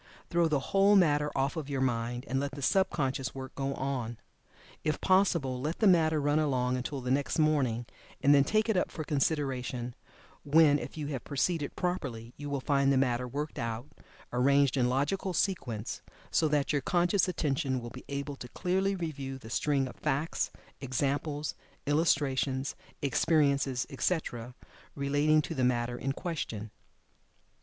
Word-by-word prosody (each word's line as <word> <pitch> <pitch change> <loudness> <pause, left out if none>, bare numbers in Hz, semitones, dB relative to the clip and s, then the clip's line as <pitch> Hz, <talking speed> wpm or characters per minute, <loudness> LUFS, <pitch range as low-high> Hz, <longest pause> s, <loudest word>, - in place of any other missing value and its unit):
Throw 170 -1 +3
the 150 -3 +1
whole 200 +1 +6
matter 150 -5 +4
off 135 +3 0
of 155 -4 -4
your 140 -2 -1
mind, 120 0 -1
and 135 +1 0
let 140 0 -3
the 140 0 -6
sub 190 +6 +3
conscious 135 -3 -2
work 130 -1 -7
go 135 0 -2
on. 125 -4 -3 0.7
If 155 - 0
possible 170 -9 +2
let 155 +5 -2
the 220 - +1
matter 160 -5 +5
run 145 +1 +2
along 130 -4 +1
until 130 +2 -3
the 125 0 -2
next 140 +1 +1
morning 140 -7 +2 0.3
and 145 - +5
then 140 -1 +6
take 215 +9 +1
it 220 - +2
up 180 - +1
for 155 - -5
consideration, 135 -5 -1 0.5
when, 150 0 +5
if - - -7
you 150 - -3
have 135 -5 -4
proceeded 145 +1 -1
properly 125 -10 -3
you 145 0 -6
will 140 -1 -1
find 140 0 +2
the 135 - +3
matter 125 -1 +1
worked 145 +3 -4
out, 115 +2 -4 0.4
arranged 140 +2 +4
in 125 -2 +2
logical 150 +9 0
sequence, 120 - -2 0.3
so 160 - +3
that 150 -1 +1
your 145 - +1
conscious 175 +5 +2
attention 140 -6 0
will 120 -1 -8
be 130 - -10
able 140 0 -3
to 125 - -8
clearly 190 +7 0
review 140 -6 -4
the 115 -3 -11
string 140 0 +1
of - - -9
facts, 150 +2 -1 0.3
examples, 145 +3 -1 0.3
illustrations, 140 -3 +1 0.3
experiences, 140 -3 +2
etc., 125 -5 -2 0.4
relating 145 +2 +2
to 165 - -4
the 130 -4 -1
matter 120 -1 +1
in 135 +2 -2
question. 115 - -4
140 Hz, 165 wpm, -30 LUFS, 130-155 Hz, 0.7 s, whole